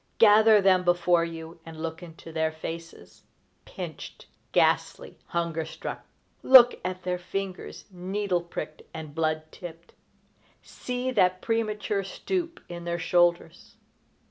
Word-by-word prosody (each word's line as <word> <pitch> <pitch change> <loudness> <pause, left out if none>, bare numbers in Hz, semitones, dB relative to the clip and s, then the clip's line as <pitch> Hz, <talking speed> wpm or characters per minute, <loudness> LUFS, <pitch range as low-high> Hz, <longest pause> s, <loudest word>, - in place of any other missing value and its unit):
Gather 215 -1 +7
them 185 -1 +4
before 175 -1 +3
you 165 0 -7
and 160 -1 -10
look 160 +1 -5
into 165 -1 -11
their 160 0 0
faces, 165 +1 -9 0.4
pinched, - - -8 0.3
ghastly, - - +1
hunger 170 -2 -2
struck! 160 - -7 0.3
Look 250 -2 +8
at 185 0 -4
their 180 0 -2
fingers, 185 +1 -6
needle 185 0 -2
picked 155 -2 -7
and 155 -2 -7
blood 155 0 0
tipped! 170 -1 -11 0.7
See 250 +1 -4
that 185 -6 +2
premature 215 -3 -1
stoop 340 - -3
in 175 -1 -7
the 170 0 -2
shoulders! 175 -1 +1
175 Hz, 120 wpm, -27 LUFS, 165-195 Hz, 0.7 s, Look